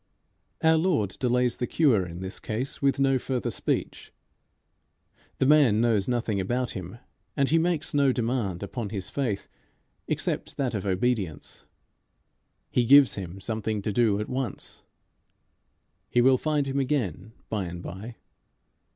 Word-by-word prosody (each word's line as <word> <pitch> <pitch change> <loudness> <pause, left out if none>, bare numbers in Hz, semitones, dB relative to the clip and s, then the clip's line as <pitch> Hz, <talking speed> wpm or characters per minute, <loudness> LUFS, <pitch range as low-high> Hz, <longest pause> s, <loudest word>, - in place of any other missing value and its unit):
Our 160 0 +5
Lord 155 - +1
delays 125 -1 +1
the 125 - -2
cure 130 - +3
in 85 +1 -8
this 95 0 -5
case 120 +5 -4
with 140 -1 +2
no 135 -1 +3
further 125 -2 -2
speech. - - -3 1.3
The - - +2
man 135 -7 +5
knows 110 -4 +2
nothing 115 -5 0
about 120 +6 -1
him, 95 +3 -7 0.4
and 140 -1 +2
he 165 - +4
makes 165 -2 0
no 140 -2 +4
demand 115 -7 -1
upon 105 +1 -4
his 95 -3 -5
faith, 120 -8 -2 0.6
except - - -2
that 130 -3 -1
of 100 -2 -3
obedience. 95 -5 -2 1.0
He 125 - +2
gives 140 +2 +7
him 95 -1 -6
something 110 0 -3
to 105 - -2
do 110 -3 +2
at 105 - -3
once. 130 -1 -5 1.3
He 120 - +2
will 130 +1 +5
find 150 -2 0
him 135 0 -1
again 110 - -2
by 105 -4 -2
and 85 0 -7
by. 110 +5 -8
120 Hz, 145 wpm, -26 LUFS, 100-135 Hz, 1.3 s, gives